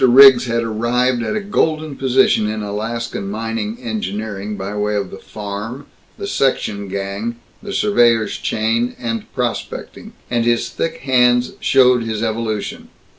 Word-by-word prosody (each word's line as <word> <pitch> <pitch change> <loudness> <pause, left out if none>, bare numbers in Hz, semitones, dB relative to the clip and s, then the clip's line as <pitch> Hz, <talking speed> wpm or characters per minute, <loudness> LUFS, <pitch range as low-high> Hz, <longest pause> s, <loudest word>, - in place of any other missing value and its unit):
Riggs 130 0 +8
had 115 0 0
arrived 120 +3 +1
at 215 - -2
a - - +1
golden 155 -7 0
position 130 -5 +3
in 110 0 -3
Alaskan 110 0 -3
mining 110 +1 -3
engineering 105 -2 -4
by 100 +2 -5
way 105 0 0
of 100 -2 -2
the 95 - -8
farm, 105 +6 -6 0.3
the 405 - -5
section 110 - 0
gang, 100 +4 -3 0.3
the 205 -2 -7
surveyor's 120 - +3
chain, 115 +3 0
and 115 -2 -4
prospecting; - - -4 0.2
and 120 -1 +2
his 120 0 +1
thick 165 - -3
hands 125 -2 +3
showed 125 -2 +4
his 110 -1 -3
evolution. 110 -2 -3
115 Hz, 140 wpm, -19 LUFS, 105-125 Hz, 0.3 s, Riggs